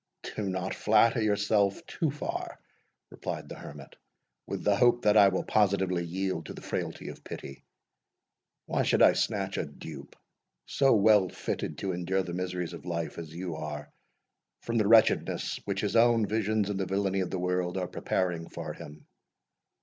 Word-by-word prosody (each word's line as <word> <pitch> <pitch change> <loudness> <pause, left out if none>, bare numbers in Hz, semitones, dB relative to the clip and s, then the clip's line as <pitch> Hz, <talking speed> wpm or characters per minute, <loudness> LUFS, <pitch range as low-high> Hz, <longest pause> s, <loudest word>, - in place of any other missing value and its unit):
"Do 105 -2 -2
not 95 0 -2
flatter 115 +2 +3
yourself 105 - +1
too 160 - -1
far," 145 +2 -5 0.5
replied - - -5
the - - -7
Hermit, 70 -1 -11 0.5
"with - - -4
the 105 - +3
hope 120 +1 +3
that 105 0 +4
I 105 -2 +8
will 95 -1 0
positively 95 -4 +2
yield 90 -1 -3
to - - -7
the - - -10
frailty - - -4
of - - -11
pity. 70 - -8 1.0
Why - - 0
should - - +3
I - - +7
snatch - - -1
a - - -1
dupe, 70 -4 -10 0.5
so 135 -3 +3
well 105 -2 +5
fitted - - -4
to 95 - -2
endure 90 +2 -1
the 85 - -6
miseries 90 -1 -3
of 85 - -9
life 85 -1 -4
as 80 -2 -8
you 85 0 -5
are, 75 -2 -6 0.7
from 115 0 0
the 105 - +2
wretchedness 110 0 +3
which 100 -1 -2
his 105 - -1
own 115 -1 +5
visions, 105 -1 0
and 100 - -3
the 95 - -1
villainy 95 0 0
of 90 -2 -1
the 95 - -3
world, 90 0 -1
are 90 -1 -1
preparing 90 -2 -2
for - - -6
him? 75 +1 -11
95 Hz, 175 wpm, -29 LUFS, 90-105 Hz, 1.0 s, I